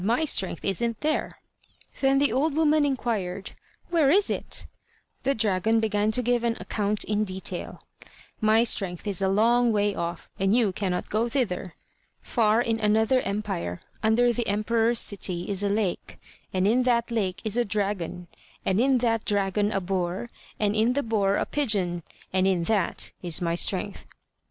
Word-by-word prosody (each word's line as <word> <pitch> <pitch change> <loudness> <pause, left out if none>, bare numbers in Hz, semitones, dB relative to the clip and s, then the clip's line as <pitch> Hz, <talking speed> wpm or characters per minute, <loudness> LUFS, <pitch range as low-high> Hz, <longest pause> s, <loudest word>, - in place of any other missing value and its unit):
my 235 +10 +1
strength 190 - 0
isn't 230 +4 -1
there." 305 0 0 0.7
Then 270 0 +3
the 280 -2 +3
old 285 +3 +1
woman 310 -1 +3
inquired: 220 -9 -2 0.4
"Where 320 -5 +4
is 395 +7 +3
it?" - - -4 0.6
The 275 - +1
dragon 220 +1 +1
began 210 -1 +1
to 250 +3 +1
give 240 0 +1
an 235 -1 0
account 210 0 -1
in 210 0 0
detail: 190 -2 -5 0.6
"My 220 +1 +4
strength 190 -6 0
is 200 -2 -2
a 190 - +2
long 235 +4 +3
way 205 -1 +1
off, 170 -1 -5
and 195 +3 +2
you 230 -5 +3
cannot 180 -1 -3
go 225 +3 +1
thither. 190 - -2 0.4
Far 225 0 +2
in 225 -1 -1
another 220 +4 +3
empire 195 - -3 0.2
under 240 +2 +3
the 235 0 -2
emperor's 225 +3 +1
city 180 -3 -1
is 200 -1 0
a 200 - +1
lake, 200 -3 -2 0.3
in 200 +7 +2
that 240 -1 +1
lake 195 -6 -1
is 215 0 -1
a 240 - +3
dragon, 195 -5 -3 0.4
and 190 +1 +1
in 265 0 +3
that 225 -1 +1
dragon 205 +1 0
a 195 - 0
boar, 185 +4 -3 0.3
and 210 -1 +1
in 225 +3 +3
the 285 +2 0
boar 205 -3 +1
a - - 0
pigeon, 200 -11 -1 0.3
and 190 0 +2
in 185 -3 +1
that 210 +2 0
is 170 -3 +1
my 170 -1 -1
strength." 195 +3 0
215 Hz, 165 wpm, -26 LUFS, 195-235 Hz, 0.7 s, Where